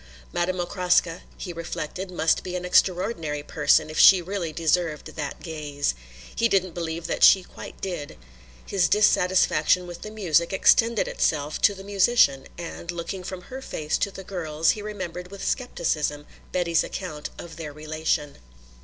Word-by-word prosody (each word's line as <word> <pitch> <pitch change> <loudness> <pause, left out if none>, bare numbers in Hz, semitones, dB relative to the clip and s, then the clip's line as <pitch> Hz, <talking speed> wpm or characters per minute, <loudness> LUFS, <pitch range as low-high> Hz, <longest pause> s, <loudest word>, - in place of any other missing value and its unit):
Madame 180 +1 0
Okraska, 180 -1 +1 0.2
he 175 - -6
reflected, 170 +2 -5
must 165 -3 +1
be 180 -1 -6
an 180 0 -3
extraordinary 180 -4 +1
person 150 +1 +3
if 155 - -4
she 190 - +9
really 180 -2 -4
deserved 165 0 -1
that 145 -3 -5
gaze. 150 - -2 0.4
He 230 - +3
didn't 185 -4 +1
believe 165 -1 -4
that - - -1
she 190 - +8
quite - - -11
did. 170 - -5 0.5
His 185 -3 +1
dissatisfaction 180 -4 +3
with 175 -1 -9
the 215 - -7
music 175 -5 +1
extended 225 +3 +4
itself 150 -1 -1
to 205 - +4
the 195 - -10
musician 195 - +3
and, 170 0 -8
looking 175 +2 -4
from 185 0 -6
her 260 +6 -8
face 155 -11 -2
to - - 0
the 190 0 -9
girl's, 165 -4 0
he 215 - -5
remembered 185 -4 -6
with 200 0 -7
scepticism 155 - -1 0.3
Betty's 170 -2 +1
account 155 -6 -6
of 170 -1 -9
their 160 -3 -6
relation. 155 0 -2
175 Hz, 155 wpm, -25 LUFS, 155-190 Hz, 0.5 s, she